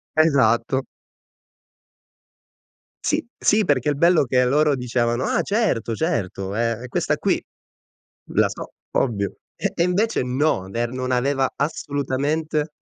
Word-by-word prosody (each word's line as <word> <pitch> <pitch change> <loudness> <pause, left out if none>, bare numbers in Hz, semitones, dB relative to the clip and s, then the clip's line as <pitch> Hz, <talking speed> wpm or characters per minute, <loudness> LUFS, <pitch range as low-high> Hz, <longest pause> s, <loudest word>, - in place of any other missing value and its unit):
Esatto. 130 -4 +3 2.2
Sì, 310 +1 0
sì, 215 +1 +3
perché 145 - +1
il 145 - +1
bello 170 +1 +5
è - - -4
che 125 0 +2
loro 145 +3 +3
dicevano: 120 -1 0
"Ah - - +1
certo, 200 - 0
certo, 100 - -2
è 115 +2 +1
è 125 - -7
questa - - 0
qui, - - 0 0.9
la - - +4
so, - - -8 0.3
ovvio." 100 -6 0 0.2
E - - -2
e 170 - +2
invece 190 - +1
no, 125 -6 0
ver 115 +4 -2
non 130 0 -3
aveva 135 +2 +1
assolutamente 145 +1 -1
135 Hz, 130 wpm, -22 LUFS, 120-155 Hz, 2.2 s, bello